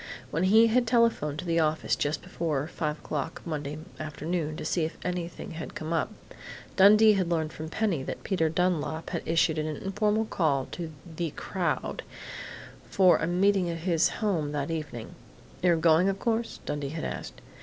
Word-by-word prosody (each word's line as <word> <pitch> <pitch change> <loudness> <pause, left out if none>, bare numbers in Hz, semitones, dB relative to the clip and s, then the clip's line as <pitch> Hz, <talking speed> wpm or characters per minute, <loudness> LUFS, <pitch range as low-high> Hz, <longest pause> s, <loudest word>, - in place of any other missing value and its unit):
When 165 +4 +1
he 220 +4 +7
had 240 +2 +2
telephoned 225 - +2
to 165 - -5
the 170 -1 +2
office 155 0 +1
just 145 0 -1
before 150 -4 -2
five 155 -2 -3
o'clock 150 +1 -4
Monday 150 -3 -3 0.2
afternoon 155 +1 -3
to - - -5
see 170 - +1
if 160 - -3
anything 175 -1 -4
had 160 0 -7
come 155 +2 -3
up, 165 +6 0 0.6
Dundee 210 +3 +7
had 185 -4 0
learned 160 -2 0
from 155 0 -6
Penny 190 -5 0
that - - -6
Peter 165 -5 +1
Dunlap 165 -1 -1
had 170 - -2
issued 160 -1 +2
an 155 - -1
informal 210 +5 0
call 145 -10 +1
to 165 -3 -5
"the 170 0 -3
crowd" - - -2 0.9
for 185 -2 +5
a - - 0
meeting 185 +1 +3
at 165 - -2
his 165 -1 +2
home 170 -10 -1
that 145 +1 -2
evening. 150 -8 -5 0.5
"You're 175 -1 +4
going, 165 +3 +4
of 195 - -1
course?" 230 +2 -1
Dundee 145 -1 -3
had 160 +2 -5
asked. - - -6
165 Hz, 175 wpm, -28 LUFS, 155-190 Hz, 0.9 s, he